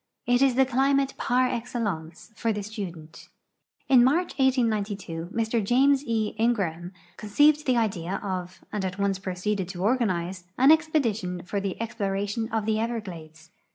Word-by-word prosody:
It 245 Hz, +1 st, +2 dB
is 270 Hz, -3 st, +4 dB
the 265 Hz, +1 st, +5 dB
climate 270 Hz, +1 st, +2 dB
par 250 Hz, +1 st, +2 dB
excellence 225 Hz, -9 st, -4 dB
for 230 Hz, 0 st, 0 dB
the 210 Hz, -1 st, -3 dB
student. 180 Hz, -7 st, -8 dB, 0.6 s
In 260 Hz, -, +6 dB
INIarcb, 295 Hz, +9 st, +3 dB
1892, 210 Hz, -10 st, 0 dB
Mr 225 Hz, 0 st, 0 dB
James 270 Hz, +6 st, +3 dB
E. 220 Hz, -2 st, 0 dB
Ingraham 185 Hz, -7 st, 0 dB, 0.3 s
conceived 290 Hz, +8 st, +3 dB
the 255 Hz, -2 st, +3 dB
idea 195 Hz, -5 st, -1 dB
of, 185 Hz, -2 st, -5 dB
and 210 Hz, -2 st, -2 dB
at 185 Hz, 0 st, -3 dB
once 200 Hz, -1 st, 0 dB
proceeded 190 Hz, 0 st, -2 dB
to 180 Hz, -1 st, -5 dB
organize, 190 Hz, -6 st, 0 dB
an 265 Hz, +4 st, +6 dB
expedition 230 Hz, -, +1 dB
for 200 Hz, +3 st, -3 dB
the 195 Hz, -2 st, -3 dB
ex])lo 225 Hz, -4 st, -2 dB
ration 205 Hz, +4 st, -2 dB
of 220 Hz, -2 st, -1 dB
tbe 215 Hz, 0 st, +1 dB
Everglades. 175 Hz, -9 st, -6 dB
215 Hz, 155 wpm, -26 LUFS, 185-245 Hz, 0.6 s, In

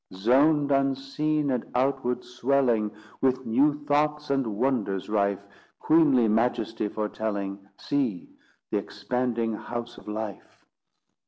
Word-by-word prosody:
Zoned 140 Hz, +8 st, +3 dB
unseen, 140 Hz, +2 st, +1 dB
and 125 Hz, -3 st, 0 dB
outward 125 Hz, -1 st, 0 dB
swelling, 125 Hz, -3 st, +1 dB, 0.3 s
With 130 Hz, -1 st, +1 dB
new 145 Hz, +5 st, +2 dB
thoughts 150 Hz, 0 st, +1 dB
and 125 Hz, -7 st, 0 dB
wonders 110 Hz, -7 st, 0 dB
rife, 100 Hz, -2 st, 0 dB, 0.3 s
Queenly 145 Hz, -7 st, +4 dB
majesty 115 Hz, -1 st, 0 dB
foretelling, 105 Hz, -2 st, -3 dB, 0.2 s
See 130 Hz, -10 st, -2 dB, 0.4 s
the -, -, +2 dB
expanding 120 Hz, -2 st, -2 dB
house 120 Hz, +2 st, -6 dB
of -, -, -18 dB
life! 105 Hz, -3 st, -6 dB
125 Hz, 105 wpm, -26 LUFS, 110-140 Hz, 0.4 s, Queenly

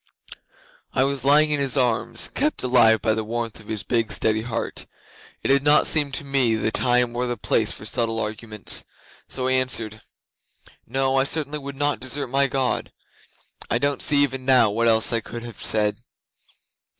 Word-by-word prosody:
'I 130 Hz, -, +2 dB
was 135 Hz, -1 st, -1 dB
lying 150 Hz, +2 st, +4 dB
in 150 Hz, -, +1 dB
his 140 Hz, 0 st, +1 dB
arms, 120 Hz, -3 st, +1 dB
kept 300 Hz, -, -1 dB
alive 120 Hz, -3 st, +4 dB
by 110 Hz, -1 st, +2 dB
the 110 Hz, 0 st, -2 dB
warmth 115 Hz, 0 st, -4 dB
of 110 Hz, -, -16 dB
his 110 Hz, -2 st, -4 dB
big, 115 Hz, -2 st, -1 dB
steady 110 Hz, 0 st, 0 dB
heart. 115 Hz, 0 st, -4 dB, 0.6 s
It -, -, -2 dB
did 140 Hz, 0 st, +4 dB
not 145 Hz, +1 st, +4 dB
seem 145 Hz, -3 st, +1 dB
to -, -, -2 dB
me 135 Hz, -5 st, +1 dB
the 110 Hz, 0 st, -1 dB
time 125 Hz, -1 st, +1 dB
or 125 Hz, +1 st, -1 dB
the 120 Hz, -1 st, -3 dB
place 110 Hz, 0 st, 0 dB
for -, -, -7 dB
subtle 115 Hz, 0 st, -1 dB
arguments, 110 Hz, -1 st, -1 dB, 0.4 s
so 130 Hz, -1 st, -3 dB
I -, -, +1 dB
answered, 115 Hz, -4 st, 0 dB, 0.9 s
"No, 135 Hz, +2 st, 0 dB
I 135 Hz, -, +4 dB
certainly 150 Hz, -1 st, -3 dB
should 140 Hz, 0 st, -7 dB
not 145 Hz, +1 st, 0 dB
desert 130 Hz, +1 st, -5 dB
my 135 Hz, +2 st, +2 dB
God." 130 Hz, -1 st, -1 dB, 0.8 s
I -, -, +2 dB
don't 140 Hz, +1 st, -1 dB
see 145 Hz, -1 st, +4 dB
even 135 Hz, -2 st, -2 dB
now 130 Hz, -5 st, +4 dB
what 115 Hz, +3 st, 0 dB
else 110 Hz, 0 st, +3 dB
I 115 Hz, -, +2 dB
could 115 Hz, +1 st, -8 dB
have 115 Hz, -3 st, -9 dB
said. 105 Hz, -1 st, +1 dB
125 Hz, 185 wpm, -22 LUFS, 115-140 Hz, 0.9 s, lying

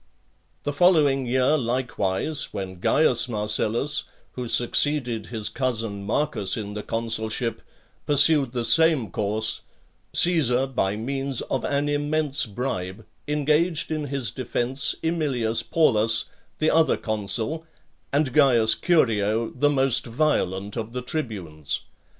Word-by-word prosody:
The 145 Hz, -, -2 dB
following 145 Hz, -6 st, +3 dB
year 130 Hz, +4 st, +2 dB
likewise, 125 Hz, +1 st, -2 dB
when 95 Hz, -2 st, -6 dB
Caius 130 Hz, -2 st, +2 dB
Marcellus, 110 Hz, +6 st, -1 dB, 0.3 s
who 125 Hz, -1 st, -6 dB
succeeded 120 Hz, -3 st, 0 dB
his 110 Hz, -3 st, -4 dB
cousin 115 Hz, -6 st, -3 dB
Marcus 110 Hz, -5 st, 0 dB
in 105 Hz, -2 st, -5 dB
the 105 Hz, -, -4 dB
consulship, 115 Hz, +1 st, -3 dB, 0.5 s
pursued 145 Hz, -2 st, +4 dB
the 120 Hz, -2 st, -2 dB
same 160 Hz, -, +4 dB
course, 110 Hz, +1 st, -2 dB, 0.5 s
Caesar, 135 Hz, -8 st, +4 dB
by 120 Hz, -7 st, -1 dB
means 135 Hz, +3 st, -2 dB
of 130 Hz, -, -3 dB
an 145 Hz, +1 st, 0 dB
immense 145 Hz, -1 st, 0 dB
bribe, 100 Hz, -3 st, -4 dB, 0.2 s
engaged 150 Hz, +2 st, +1 dB
in 155 Hz, -1 st, -2 dB
his 130 Hz, -5 st, -3 dB
defence 130 Hz, +3 st, -1 dB
Aemilius 140 Hz, -9 st, 0 dB
Paulus, 115 Hz, -8 st, +2 dB, 0.3 s
the 155 Hz, -, +2 dB
other 160 Hz, 0 st, +3 dB
consul, 110 Hz, +9 st, -2 dB, 0.4 s
and 140 Hz, -2 st, 0 dB
Caius 120 Hz, -7 st, +4 dB
Curio, 115 Hz, -, +1 dB
the 145 Hz, +3 st, +1 dB
most 135 Hz, -4 st, +1 dB
violent 105 Hz, -, -1 dB
of 115 Hz, 0 st, -5 dB
the 125 Hz, 0 st, -4 dB
tribunes. 95 Hz, -, -3 dB
125 Hz, 120 wpm, -24 LUFS, 110-145 Hz, 0.5 s, pursued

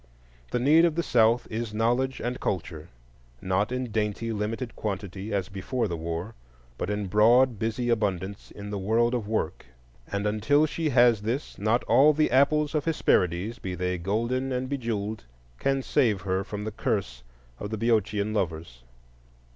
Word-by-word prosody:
The -, -, -1 dB
need 150 Hz, +6 st, +5 dB
of 170 Hz, -3 st, +3 dB
the 170 Hz, -, 0 dB
South 115 Hz, -2 st, +3 dB
is 110 Hz, -1 st, -4 dB
knowledge 120 Hz, +4 st, +1 dB
and 125 Hz, +1 st, -3 dB
culture,—not 75 Hz, -, -4 dB
in 125 Hz, -2 st, -3 dB
dainty 110 Hz, +1 st, -1 dB
limited 115 Hz, +3 st, -3 dB
quantity, 100 Hz, 0 st, -5 dB
as 100 Hz, -3 st, -1 dB
before 100 Hz, +6 st, -2 dB
the 85 Hz, -, -3 dB
war, 85 Hz, +6 st, -4 dB, 0.5 s
but -, -, -2 dB
in 105 Hz, 0 st, -2 dB
broad 115 Hz, +4 st, +4 dB
busy 115 Hz, +2 st, -1 dB
abundance 100 Hz, -4 st, -1 dB
in 105 Hz, 0 st, -8 dB
the 100 Hz, -, -3 dB
world 115 Hz, +5 st, +2 dB
of 115 Hz, -4 st, -2 dB
work; 95 Hz, -, -2 dB, 0.4 s
and 100 Hz, 0 st, -2 dB
until 110 Hz, +9 st, +3 dB
she 155 Hz, +1 st, -2 dB
has 120 Hz, -4 st, +5 dB
this, 120 Hz, +7 st, -3 dB
not 110 Hz, +4 st, +1 dB
all 135 Hz, +6 st, +5 dB
the 155 Hz, -2 st, +1 dB
Apples 145 Hz, +3 st, +3 dB
of 150 Hz, -2 st, 0 dB
Hesperides, 105 Hz, -, +1 dB
be 95 Hz, -1 st, -4 dB
they 90 Hz, 0 st, -2 dB
golden 115 Hz, +8 st, -1 dB
and 130 Hz, 0 st, -2 dB
bejewelled, 110 Hz, -, -3 dB, 0.4 s
can 135 Hz, -1 st, 0 dB
save 105 Hz, -7 st, +2 dB
her 95 Hz, 0 st, -1 dB
from 105 Hz, 0 st, -6 dB
the 110 Hz, -, -4 dB
curse 95 Hz, -, -2 dB, 0.4 s
of 105 Hz, -, -5 dB
the 110 Hz, -, -3 dB
Boeotian 110 Hz, -2 st, +1 dB
lovers. 80 Hz, -, -3 dB
110 Hz, 165 wpm, -27 LUFS, 95-125 Hz, 0.5 s, need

